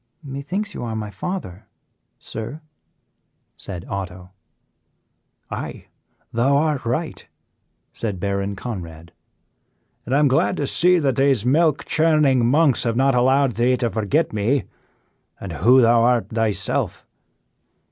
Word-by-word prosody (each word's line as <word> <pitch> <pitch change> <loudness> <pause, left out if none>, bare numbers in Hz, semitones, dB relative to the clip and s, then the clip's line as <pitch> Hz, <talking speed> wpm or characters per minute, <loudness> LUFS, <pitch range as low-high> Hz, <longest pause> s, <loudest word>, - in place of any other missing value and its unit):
"Methinks 150 +10 -4
you - - -6
are 115 -2 -4
my 105 -1 -5
father, 105 - -6 0.5
sir," 120 +8 -7 0.9
said 90 -3 -7
Otto. 90 -1 -6 1.2
"Aye, - - -6 0.4
thou 135 +5 +2
art 150 -5 0
right," 155 +7 -3 0.7
said 105 -5 -4
Baron 100 +1 -2
Conrad, 85 -7 -7 1.0
"and 130 - +1
I - - +4
am 150 0 +4
glad 135 - +1
to 145 - -1
see 180 +6 +4
that 140 -7 0
these 135 -5 +2
milk 150 +2 +2
churning 150 -5 +3
monks 140 +2 +3
have 115 -1 -1
not 135 +2 +3
allowed 130 +2 +3
thee 125 +2 +2
to 120 -3 -1
forget 115 +9 0
me, 115 +6 +1 0.8
and 95 -4 -7
who 120 - +5
thou 115 0 +4
art 120 -3 +2
thyself." 110 -2 -2
125 Hz, 125 wpm, -21 LUFS, 105-140 Hz, 1.2 s, who